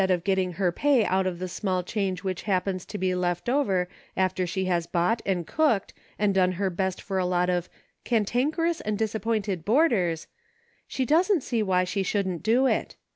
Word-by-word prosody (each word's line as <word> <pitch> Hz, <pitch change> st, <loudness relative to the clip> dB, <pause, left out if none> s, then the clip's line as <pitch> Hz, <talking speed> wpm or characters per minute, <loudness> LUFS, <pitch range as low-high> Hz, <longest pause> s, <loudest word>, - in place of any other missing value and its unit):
of 180 Hz, -2 st, +1 dB
getting 190 Hz, -2 st, 0 dB
her 180 Hz, 0 st, +1 dB
pay 265 Hz, +3 st, +3 dB
out 190 Hz, 0 st, +1 dB
of 180 Hz, -2 st, -3 dB
the 185 Hz, +1 st, -4 dB
small 185 Hz, 0 st, -2 dB
change 190 Hz, -1 st, -2 dB
which 185 Hz, -2 st, -3 dB
happens 185 Hz, -1 st, 0 dB
to 210 Hz, -, -5 dB
be 185 Hz, -2 st, 0 dB
left 175 Hz, +1 st, -1 dB, 0.7 s
after 185 Hz, -1 st, +1 dB
she 190 Hz, +2 st, -2 dB
has 175 Hz, -2 st, 0 dB
bought, 180 Hz, +6 st, +1 dB
and 180 Hz, -3 st, 0 dB
cooked, 290 Hz, -, +1 dB, 0.2 s
and 205 Hz, -1 st, +2 dB
done 185 Hz, -1 st, +3 dB
her 190 Hz, +1 st, -1 dB
best 190 Hz, +1 st, -2 dB
for 190 Hz, -2 st, -3 dB
a 185 Hz, -, +1 dB
lot 180 Hz, 0 st, +1 dB
of 175 Hz, 0 st, -1 dB, 0.2 s
* -, -, -45 dB
cantankerous 270 Hz, -, 0 dB
and 210 Hz, -1 st, -2 dB
disappointed 215 Hz, -4 st, -1 dB
boarders,' 205 Hz, -, +2 dB, 0.6 s
she 260 Hz, -, -2 dB
doesn't 340 Hz, -, +3 dB
see 235 Hz, -3 st, -1 dB
why 185 Hz, -3 st, +2 dB
she 195 Hz, +2 st, -2 dB
shouldn't 190 Hz, -3 st, -1 dB
do 240 Hz, +5 st, +3 dB
it. -, -, 0 dB
190 Hz, 185 wpm, -26 LUFS, 180-220 Hz, 0.7 s, pay